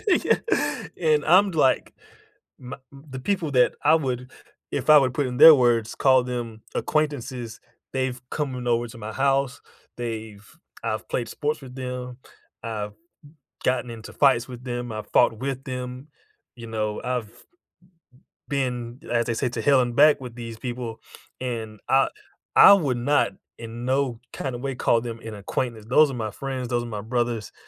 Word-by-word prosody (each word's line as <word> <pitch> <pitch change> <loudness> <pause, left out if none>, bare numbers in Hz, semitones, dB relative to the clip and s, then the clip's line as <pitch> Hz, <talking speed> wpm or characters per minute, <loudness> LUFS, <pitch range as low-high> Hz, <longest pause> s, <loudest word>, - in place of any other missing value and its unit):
Yeah, 370 - +3 0.6
and 155 -3 +3
I'm 190 +5 +6
like, 140 -5 +2 0.7
my 130 +3 -7 0.2
m 135 0 -13
the 130 0 -6
people 180 -6 0
that 125 -1 +4 0.2
I - - +8
would 125 -2 -1 0.6
if - - 0
I 150 - +10
would 130 -3 +1
put 140 0 0
in 125 0 -4
their 160 0 +11
words, 120 -4 +2
call 130 -2 +4
them 120 -3 -5
acquaintances, 130 -6 -2 0.4
they've 130 -1 -1
coming 130 -5 -3
over 120 0 +1
to 115 - -12
my 110 0 -6
house, 135 0 +1 0.4
they've 110 -3 -6 0.4
I've - - -3
played 120 -2 -2
sports 150 0 -2
with 130 -1 -10
them, 125 -1 -5 0.4
I've 105 -3 -4 0.7
gotten 125 -1 0
into 110 -1 -9
fights 130 -4 +3
with 125 -1 -9
them, 120 -2 -4
I've 110 0 -6
fought 115 -3 +4
with 135 0 -4
them, 125 +2 -6 0.5
you 115 -1 -9
know, 105 -1 -2
I've 125 -4 -2 1.2
been 125 -3 -2
as 120 -1 +1
they 120 - -1
say, 125 +3 -1
to 120 -1 -3
hell 140 0 +5
and 120 -1 0
back 150 0 +6
with 125 -3 -9
these 115 -2 -8
people, 120 -3 -5 0.4
and 115 -4 -5
I 135 0 +4 0.5
I - - +10
would 140 -10 +2
not, 145 +4 +2 0.3
in 115 +1 -7
no 130 -3 0
kinda 130 -3 -4
way, 135 +1 -4
call 120 - +2
them 115 -1 -6
an 115 -2 -8
acquaintance, 110 +2 -4
those 140 +5 +4
are - - -6
my 110 -3 -3
friends, 130 -1 -4
those 120 -1 -1
are - - -6
my 110 -3 -5
brothers, 120 -1 -2
125 Hz, 170 wpm, -24 LUFS, 115-135 Hz, 1.2 s, their